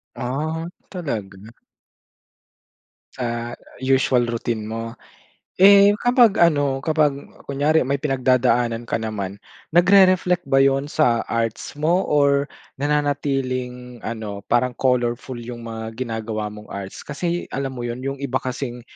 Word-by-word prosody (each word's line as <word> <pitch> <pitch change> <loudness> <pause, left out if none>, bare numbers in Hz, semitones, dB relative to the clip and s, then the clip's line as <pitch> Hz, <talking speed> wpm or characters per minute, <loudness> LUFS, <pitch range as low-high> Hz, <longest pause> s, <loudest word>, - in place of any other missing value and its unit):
Ah, 155 +6 -3 0.2
talaga. 110 - -6 1.6
Sa 120 -1 -3 0.2
usual 130 -2 +2
routine 115 -2 -3
mo. 115 +1 -5 0.6
Eh, 200 +1 +8
kapag 245 -4 +4
ano, 145 -5 +3
kapag 155 -2 +2 0.3
kunyari 145 +3 +2
may 140 +2 0
pinagdadaanan 125 -4 +1
ka - - +1
naman, 100 -3 -4 0.4
nagre-reflect 180 -1 +5
ba 135 - +3
yun 135 0 +3
sa 120 -7 +2
arts 115 -1 -2
mo 165 +5 +2
or 140 -1 +3 0.4
nananatiling 130 -4 -1
ano, 110 -3 -5
parang 125 +1 +2
colorful 125 -1 0
yung 120 0 -8
mga 115 0 -6
ginagawa 110 -3 -3
mong 105 0 -12
arts? 100 -1 -7
Kasi, 170 +4 -3
alam 135 -1 -3
mo 120 -2 -5
yun, 120 +1 -4
yung 135 +1 -3
iba 130 -2 0
kasing 125 -1 -4
130 Hz, 120 wpm, -22 LUFS, 115-145 Hz, 1.6 s, Eh